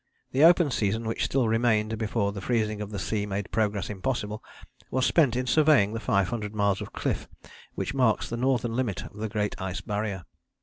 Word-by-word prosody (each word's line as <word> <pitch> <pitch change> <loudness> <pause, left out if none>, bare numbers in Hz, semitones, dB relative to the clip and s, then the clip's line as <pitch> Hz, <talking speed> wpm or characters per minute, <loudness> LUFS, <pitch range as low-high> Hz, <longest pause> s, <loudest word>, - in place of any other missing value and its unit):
The 135 +3 +3
open 170 -3 +6
season 110 0 0
which 110 - -1
still 130 -3 +1
remained 110 -1 +1
before 105 -2 0
the 100 -1 -7
freezing 110 -2 0
of 105 - -5
the 105 - -5
sea 105 0 -2
made 100 0 -4
progress 105 -3 0
impossible 105 +1 -3 0.5
was 130 0 +1
spent 140 -8 +3
in 125 0 -1
surveying 145 -8 +4
the 115 - -3
500 105 +1 -1
miles 100 -2 +1
of - - -7
cliff - - -2 0.5
which 125 - -3
marks 125 -5 +2
the 115 - -4
northern 120 -2 0
limit 120 -7 -1
of - - -11
the 110 +1 -3
Great 105 -1 -1
Ice 95 -1 -3
Barrier. 100 -3 -3
110 Hz, 190 wpm, -27 LUFS, 105-120 Hz, 0.5 s, open